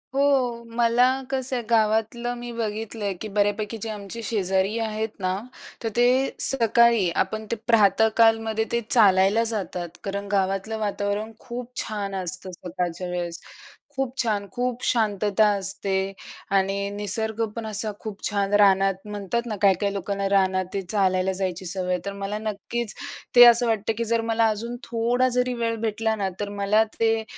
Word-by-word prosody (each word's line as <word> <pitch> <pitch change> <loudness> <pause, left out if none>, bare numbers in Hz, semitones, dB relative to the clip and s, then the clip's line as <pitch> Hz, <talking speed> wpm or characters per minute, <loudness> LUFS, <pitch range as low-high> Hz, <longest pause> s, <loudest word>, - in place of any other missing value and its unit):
हो, 260 -4 +2
मला 235 +1 +4 0.3
कसं 260 -1 -2
आहे 240 - -2
गावातलं 225 +2 +1
मी 240 0 -6
बघितलंय, 215 -2 -3
की 220 - -4
बऱ्यापैकी 205 +2 0
जे 225 - -4
आमची 210 +2 -6
शेजारी 195 0 0
आहेत 220 0 -2
ना 185 -1 0 0.5
तर 225 - 0
ते 240 - +4 0.3
सकाळी 235 -5 +3
आपण 220 +3 -6
ते - - +1
प्रातःकालमध्ये 220 0 +3
ते 235 0 +1
चालायला 200 0 +5
जातात. 190 -6 -3
कारण 200 0 -4
गावातलं 195 +2 0
वातावरण 205 +1 -2
खूप 245 -1 -7
छान 200 -2 -4
असतं 185 +1 -4
सकाळच्या 180 0 -4
वेळेस. 175 -1 -4 0.5
खूप 265 -1 -2
छान, 205 -3 -1
खूप 250 +1 -3
शांतता 210 -2 +2
असते 195 0 +1 0.4
आणि 195 +1 +1
निसर्ग 220 +2 0
पण 230 -1 -5
असा 215 0 +1
खूप 210 -2 -8
छान! 200 -1 -1
रानात 195 -2 +4
म्हणतात 210 +3 -3
ना, 220 - -3
काही-काही 200 0 +3
लोकांना 200 0 -2
रानात 190 -1 +2
ते 195 - -1
चालायला 190 -2 +2
जायची 185 -1 -3
सवय 180 +1 -2
आहे. 180 - 0
तर 200 - -3
मला 200 +1 -4
नक्कीच 215 +2 -3 0.4
ते 245 - +11
असं 240 0 +6
वाटतं, 220 -1 0
की 230 - -1
जर 230 0 +1
मला 225 0 +3
अजून 230 +3 -3
थोडा 245 +2 +1
जरी 250 0 0
वेळ 230 - 0
भेटला 220 0 0
ना 195 -2 -1
तर 205 -1 -3
मला 210 +2 +4 0.2
ते 225 0 +2
215 Hz, 155 wpm, -24 LUFS, 195-230 Hz, 0.5 s, ते